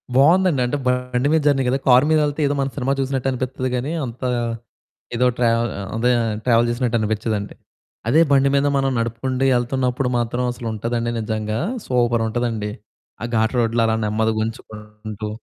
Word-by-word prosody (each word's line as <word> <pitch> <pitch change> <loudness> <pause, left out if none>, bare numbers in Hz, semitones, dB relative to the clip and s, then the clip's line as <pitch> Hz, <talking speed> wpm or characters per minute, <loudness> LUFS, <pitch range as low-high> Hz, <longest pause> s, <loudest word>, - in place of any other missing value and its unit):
బావుందండి. 165 0 +4
అంటే, 145 +4 -1
బండి 125 +1 0
మీద 160 - +3
జర్నీ 135 -2 +3
గదా! 130 +2 +2
కారు 125 +2 +6
మీదెళ్తే 150 -1 +1
ఏదో 145 - 0
మనం 135 0 -1
సినిమా 135 +1 0
చూసినట్టనిపిత్తది 130 -1 -2
గానీ, 130 +6 -2
అంతా 125 +2 -4 0.9
ఏదో 125 +1 +3
ట్రావ్ 115 -1 +2 0.2
ఆహ్, 95 - -5
అదే 125 +2 +2 0.3
ట్రావెల్ 120 -1 +4
జేసినట్టనిపిచ్చదండి. 110 -3 -1 0.5
అదే 155 +6 +5
బండి 140 0 +4
మీద 140 +1 +3
మనం 135 0 +1
నడుపుకుంటూ 125 +3 -2
యెళ్తన్నప్పుడు 125 +1 0
మాత్రం 120 +1 -1
అసలుంటదండి 115 +1 -3
నిజంగా 110 0 -2 0.3
సూపరుంటదండి, 115 -3 0 0.5
ఆ - - -2
ఘాట్ 110 +3 +1
రోడ్‌లో 115 0 +2
అలా 110 0 +1
నెమ్మదిగుంచుకుంటూ. 110 -1 -3
120 Hz, 135 wpm, -21 LUFS, 110-130 Hz, 0.9 s, కారు